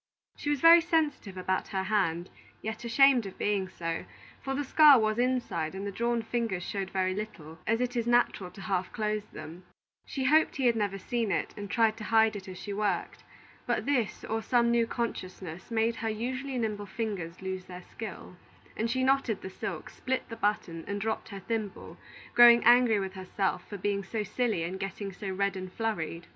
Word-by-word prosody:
She 290 - -4
was 290 -3 0
very 335 +1 +9
sensitive 305 - 0
about 185 +1 -1
her 190 -1 -2
hand, 190 -4 0 0.3
yet 220 +2 -4
ashamed 245 -1 +5
of 190 - -10
being 200 -2 0
so; 165 -2 -4 0.4
for 270 0 -3
the 290 - -1
scar 295 0 +7
was 215 0 +1
inside 240 -10 0
and 195 +1 -5
the 200 - -3
drawn 235 +2 0
fingers 225 -6 -2
showed 195 0 -3
very 185 -1 0
little, 170 -6 -7
as 225 +1 +2
it 250 0 -1
is 235 -1 0
natural 240 -6 +2
to 190 +2 -12
half 185 -1 -1
close 215 -1 -2
them. 175 -2 -10 0.4
She 270 - -3
hoped 310 +4 +4
he 270 - -1
had 235 -1 +4
never 205 -3 -1
seen 230 +1 -2
it, - - -1
and 205 -1 -7
tried 225 0 +2
to 215 - -7
hide 220 -1 +4
it 195 -2 -7
as 185 -1 -8
she 205 - -6
worked. 210 0 -2 0.4
But - - 0
this, 255 -7 0
or 225 0 -2
some 235 0 +2
new 235 -1 +3
consciousness, 185 -7 -5
made 230 0 +1
her 225 - -2
usually 255 +5 -3
nimble 210 -3 -2
fingers 190 -7 -4
lose 190 -1 -4
their 180 -1 -9
skill, 190 -4 -8 0.4
and 225 +1 -1
she 260 +2 0
knotted 260 -5 +1
the 190 - -6
silk, - - -5
split 260 0 -3
the 230 - -6
button, 205 -6 -1
and 200 0 -2
dropped 220 +2 -2
her 200 -2 -7
thimble, 215 -1 -4 0.4
growing 240 0 +8
angry 240 -2 +6
with 190 -1 -4
herself 190 +1 -2
for 205 - -5
being 200 +1 -1
so 215 +3 -3
silly 220 -4 -1
and 185 +3 -4
getting 195 0 -5
so 195 +2 -6
red 200 +1 0
and 185 -1 -6
flurried. 175 -6 -3
215 Hz, 200 wpm, -29 LUFS, 190-235 Hz, 0.4 s, very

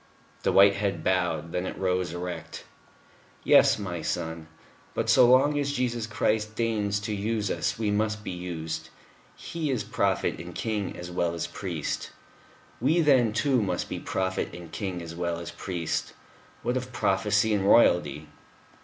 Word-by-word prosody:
The - - +1
white 100 0 +6
head 100 -5 -1
bowed. 90 -3 0
Then 90 +2 -2
it - - -6
rose 90 -2 0
erect. 90 +1 -6 0.8
"Yes, - - +6
my 90 -5 -4
son.... 80 -1 -3 0.5
But - - +1
so 125 - +7
long 145 +3 +5
as 145 0 -1
Jesus 120 -4 -1
Christ 105 -1 0
deigns 105 -3 0
to 105 +1 -3
use 105 +1 -1
us, - - -1
we 110 -2 0
must 105 0 0
be - - -4
used. 85 -3 -5 0.5
He 165 -3 -4
is 125 -6 0
Prophet - - 0
and 85 0 -8
King 105 -4 -2
as 90 0 -7
well 85 -1 0
as 85 0 -2
Priest. 85 -2 -4 0.7
We 150 +8 +3
then, 130 -7 +4
too, 125 +3 +2
must 90 -4 -2
be - - -4
prophet 95 0 -2
and 85 -2 -10
king 95 -4 -4
as 85 0 -7
well 85 -1 -2
as 85 0 -6
priest. 85 -1 -3 0.5
What 125 +2 0
of 130 0 -5
Prophecy 100 +1 +2
and 100 -2 +1
Royalty?" 90 -8 +4
100 Hz, 160 wpm, -27 LUFS, 85-110 Hz, 0.8 s, so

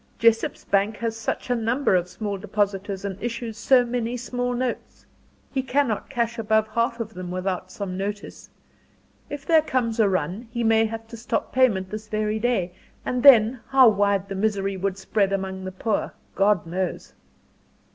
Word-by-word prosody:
Jessop's 230 -1 +2
bank 205 +2 +1
has 230 -1 -2
such 225 +2 -3
a - - +3
number 235 +2 +1
of 180 -1 +1
small 205 +2 -4
depositors 200 -1 -2
and 195 -1 -5
issues 230 -1 -4
so 245 +3 +4
many 240 0 -2
small 245 0 -2
notes. 250 0 -4 0.5
He 270 - 0
cannot 260 -4 0
cash 235 -3 -1
above 220 0 +2
half 235 +2 0
of 225 -1 -5
them 180 -1 -7
without 185 0 -3
some 190 -2 -5
notice. 205 +1 -5 0.8
If 290 0 -6
there 320 -2 +5
comes 240 -6 -1
a 210 -3 +5
run, 185 +6 -2
he 235 0 -2
may 225 0 +4
have 225 0 -6
to 230 - -8
stop 235 +2 -3
payment 210 -8 +2
this 215 0 -6
very 215 0 -1
day; 215 -7 0 0.3
and 250 -1 -1
then, 240 -2 +7
how 265 -3 +7
wide 200 -2 +1
the 195 - -5
misery 195 -1 0
would 190 0 -2
spread 195 +1 0
among 190 -1 -3
the 185 - -4
poor, 205 +3 -2 0.2
God 195 -3 +2
knows." 180 +2 -4
215 Hz, 175 wpm, -24 LUFS, 195-235 Hz, 0.8 s, then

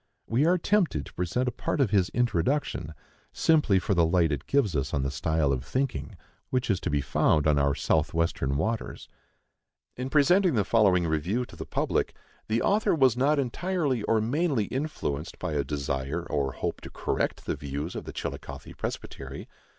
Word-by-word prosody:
We 130 +7 +2
are 180 +1 +4
tempted 175 - +1
to - - -13
present 90 +9 -1
a - - +1
part 145 - -3
of 130 -7 +2
his 95 -4 +3
Introduction, 115 - 0 0.4
simply 150 -12 +3
for 100 +2 0
the 85 -2 +4
light 85 -1 +3
it 70 -2 -3
gives 125 - +2
us 70 -1 -1
on 70 - 0
the 70 - -1
style 75 +1 +1
of 65 -1 -2
thinking 130 - -2 0.3
which 125 -3 0
is 95 - +1
to - - -3
be 75 -1 +1
found 75 +2 +2
on 75 -2 +4
our 70 0 +2
south - - +1
western 80 -5 0
waters: 110 +7 -3 0.9
In 130 +1 -3
presenting 165 +4 +4
the 105 -4 +2
following 95 -6 +4
review 85 +10 0
to - - -14
the - - -7
public, - - 0 0.3
the 110 +2 +1
author 205 -2 +3
was 130 -6 +4
not 140 +4 +2
entirely 140 - 0
or 110 +1 +2
mainly 135 +2 +1
influenced 100 - -3
by 90 -4 -3
a 70 -1 +1
desire 70 +2 -2
or 70 -5 -1
hope - - -3
to - - -8
correct - - -2
the - - -1
views 70 +4 -5
of - - -6
the - - -6
Chillicothe - - -6
Presbytery. - - -6
100 Hz, 185 wpm, -27 LUFS, -, 0.9 s, are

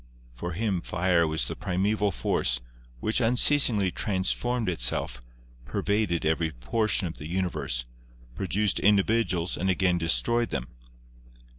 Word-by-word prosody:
For 85 +9 -6
him 95 -1 -1
fire 85 -1 +1
was 80 0 -1
the - - -5
primeval 100 +3 0
force, - - 0 0.4
which 110 +4 +1
unceasingly 115 -4 +5
transformed 105 +6 -1
itself, 60 -6 -1 0.4
pervaded 100 - -1
every 80 +1 +1
portion 95 - 0
of 80 -6 -6
the 75 - -7
universe, 85 -9 -1 0.5
produced 100 +5 -1
individuals 100 -3 +1
and 95 - -2
again 90 -1 +1
destroyed 80 - +1
them. - - -4
95 Hz, 120 wpm, -26 LUFS, 80-105 Hz, 0.5 s, unceasingly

